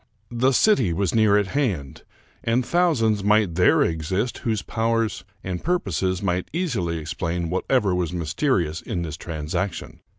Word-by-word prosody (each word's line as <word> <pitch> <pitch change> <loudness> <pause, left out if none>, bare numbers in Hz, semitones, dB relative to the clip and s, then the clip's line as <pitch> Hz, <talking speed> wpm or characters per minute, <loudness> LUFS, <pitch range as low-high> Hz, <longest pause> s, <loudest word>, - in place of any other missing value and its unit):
The 125 +3 +2
city 130 - +3
was 95 0 0
near 110 -2 +4
at 100 -2 0
hand, 95 - -2 0.4
and 120 +2 +1
thousands 120 - +2
might 105 -3 +3
there 90 +1 +4
exist 90 +8 -2
whose 110 -5 -1
powers 115 -1 -1 0.2
and 90 -2 -4
purposes 95 - -1
might 90 -1 -1
easily 120 - -1
explain 85 +1 -3
whatever 100 +1 +1
was 90 -2 -1
mysterious 85 - -1
in 85 - -3
this 80 -1 -5
transaction. 85 +3 -4
95 Hz, 140 wpm, -23 LUFS, 85-115 Hz, 0.4 s, near